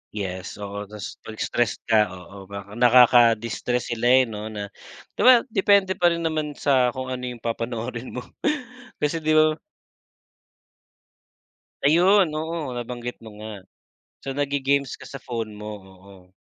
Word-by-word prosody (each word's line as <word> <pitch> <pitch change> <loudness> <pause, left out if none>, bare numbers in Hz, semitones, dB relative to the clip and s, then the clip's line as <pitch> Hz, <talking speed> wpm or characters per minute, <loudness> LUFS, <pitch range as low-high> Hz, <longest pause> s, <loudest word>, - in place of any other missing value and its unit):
Yes 95 -2 -5
oo, 100 0 -6
tas 105 -2 -8
pag 110 - -10
stress 120 0 0
ka, 110 -2 +3
oo, 95 +2 -12
baka 100 0 -8
nakaka-distress 120 -1 +4
sila 120 +1 0
eh 130 +1 +6
'no, 110 -3 -6
na 105 -2 -6 0.4
'di - - -4
ba 255 - +11 0.2
depende 195 -1 +3
pa 175 - +5
rin 170 -1 0
naman 155 -2 -2
sa 130 -3 +2
kung 130 0 -4
ano 125 0 -4
yung 120 -2 -8
papanoorin 120 +1 -4
mo. 125 - -4 0.8
Kasi 155 +3 +1
'di 155 0 +1
ba 155 0 +4 2.3
Ayun, 180 +6 +5
oo, 160 -4 -4
nabanggit 120 0 -5
mo 110 - -10
nga. 110 +1 -7 0.7
So 135 -1 -4
nagge-games 140 -1 0
ka - - -11
sa 135 - -8
phone 115 -3 -4
mo, 105 +1 -7 0.2
oo. 95 -1 -18
120 Hz, 145 wpm, -24 LUFS, 105-145 Hz, 2.3 s, ba